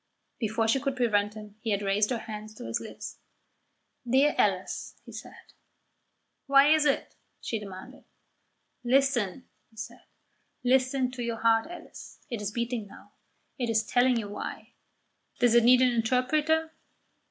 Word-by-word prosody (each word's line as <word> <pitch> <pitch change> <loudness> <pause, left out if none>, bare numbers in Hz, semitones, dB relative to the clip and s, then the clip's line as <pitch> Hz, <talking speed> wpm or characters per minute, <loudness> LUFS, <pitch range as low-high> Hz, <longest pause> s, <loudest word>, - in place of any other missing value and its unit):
Before 225 0 0
she 230 +5 +3
could 275 0 -2
prevent 210 -4 +1
him 210 -1 -11
he 220 - -4
had 205 -1 0
raised 200 +1 +2
her 245 - 0
hand 215 -1 -7
to - - -8
his 115 - -1
lips. 225 - -8 0.9
"Dear 275 +4 +4
Alice!" - - 0
he - - -11
said. - - -11 0.9
"Why 280 +2 +6
is 310 -1 +3
it?" 280 - 0 0.3
she 225 - -3
demanded. 205 +6 -10 0.8
"Listen!" 255 -3 +1 0.2
he 220 - -26
said. 220 - -8 0.6
"Listen 255 0 +2
to 250 -1 -7
your 235 -1 -2
heart, 225 +1 +3
Alice; 350 - -11
it 230 -3 -3
is 205 - -2
beating 235 -1 -3
now. 200 - -15 0.5
It 240 -2 -1
is 220 -1 +2
telling 245 +1 +3
you 220 -3 -3
why. 205 - -7 0.6
Does 245 -2 +3
it 235 -1 +6
need 250 +2 +6
an 250 - +4
interpreter? 300 +7 +1
235 Hz, 155 wpm, -28 LUFS, 215-260 Hz, 0.9 s, Why